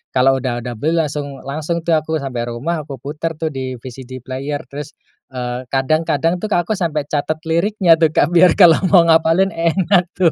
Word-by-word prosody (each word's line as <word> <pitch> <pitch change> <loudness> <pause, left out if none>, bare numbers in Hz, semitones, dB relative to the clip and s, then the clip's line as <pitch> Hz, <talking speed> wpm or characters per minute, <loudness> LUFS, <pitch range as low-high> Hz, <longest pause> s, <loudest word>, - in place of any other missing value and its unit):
kalau 135 +1 +3
udah 120 -2 -3
udah 120 -2 -6
beli 160 +3 0
langsung 145 -4 -3
langsung 155 +4 -3
tuh 170 - -1
aku 160 0 +1
sampai 120 -3 -4
rumah 150 +6 -4
aku 135 - -6
putar 150 +5 -5
tuh 160 0 -3
di 130 -2 -5
VCD 130 +1 -10
Player. 140 +3 -5
Terus, 145 +3 -9 0.3
eee, 125 -1 -5
kadang-kadang 160 +6 0
tuh 215 - -3
aku 175 +4 -1
sampai 165 -7 -1
catet 150 +2 -2
liriknya 170 0 +2
tuh, 160 - +5
Kak, - - +3
biar 175 0 +5
kalau 170 -5 +6
mau 180 -3 +6
ngapalin 165 +3 +3
enak 175 +2 +1
tuh. 175 -3 +3
155 Hz, 185 wpm, -18 LUFS, 130-170 Hz, 0.3 s, kalau